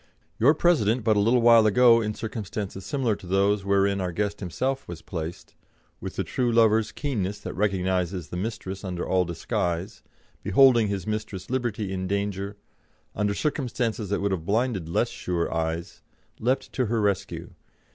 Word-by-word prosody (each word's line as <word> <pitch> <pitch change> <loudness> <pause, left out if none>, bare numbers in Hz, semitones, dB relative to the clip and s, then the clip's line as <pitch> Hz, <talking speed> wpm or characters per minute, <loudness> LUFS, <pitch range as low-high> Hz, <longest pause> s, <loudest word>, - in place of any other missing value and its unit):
Your 140 +7 +5
President 125 -10 +2
but 110 -1 +3
a - - +3
little 115 +4 +3
while 115 -2 +7
ago 115 +2 +6
in 105 -1 -2
circumstances 105 -3 -5
similar 130 -5 0
to 90 - -12
those 100 +2 +2
wherein 100 0 +2
our 90 -1 -2
guest 100 +3 -2
himself 130 +9 -2
was 85 -2 -8
placed, 80 -1 -6 0.5
with - - -6
the - - -1
true 125 -2 -1
lover's 110 -1 +4
keenness 105 -9 -2
that - - -5
recognises 95 -3 -1
the - - -6
mistress 95 -1 -4
under 90 -2 -4
all 90 -1 +2
disguise, 85 +2 -3 0.4
beholding 120 -1 +5
his 100 -3 -3
mistress 105 -2 -4
Liberty 110 -6 -2
in 95 0 -3
danger, 100 0 -2 0.6
under 105 0 0
circumstances 120 -7 -2
that 100 - 0
would 100 0 0
have 90 -4 -2
blinded 105 -3 0
less 85 - +1
sure 85 -2 -2
eyes, 80 +1 -3 0.4
leapt 125 +4 -1
to 125 -4 0
her 115 +1 0
rescue. 100 -3 -1
100 Hz, 165 wpm, -26 LUFS, 95-115 Hz, 0.6 s, while